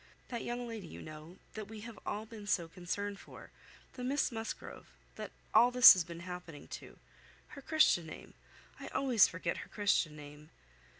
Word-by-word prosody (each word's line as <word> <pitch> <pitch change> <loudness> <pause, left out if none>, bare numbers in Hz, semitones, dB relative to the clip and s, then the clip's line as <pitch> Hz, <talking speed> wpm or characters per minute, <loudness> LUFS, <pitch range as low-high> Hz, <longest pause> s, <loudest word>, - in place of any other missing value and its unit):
That 235 -2 -4
young 240 0 -4
lady, 220 -6 -7
you - - -10
know, 155 +3 -10 0.2
that 215 -2 -6
we 220 -1 -9
have 225 -2 -9
all 210 +1 -3
been 215 -2 -10
so 175 -5 +1
concerned 195 +4 -4
for. - - -13 0.4
The 250 - -7
Miss 275 +3 +1
Musgrove, 225 -1 -6 0.3
that - - -6 0.2
all 240 - +7
this 250 0 +11
has 185 - 0
been 170 0 -9
happening 180 -4 -8
to. - - -9 0.5
Her 280 - -10
Christian 310 - +3
name: 155 - -10 0.5
I - - -7
always 250 -6 +4
forget 170 0 -3
her - - -8
Christian 195 -7 +1
name." 150 +1 -12
205 Hz, 175 wpm, -34 LUFS, 170-235 Hz, 0.5 s, this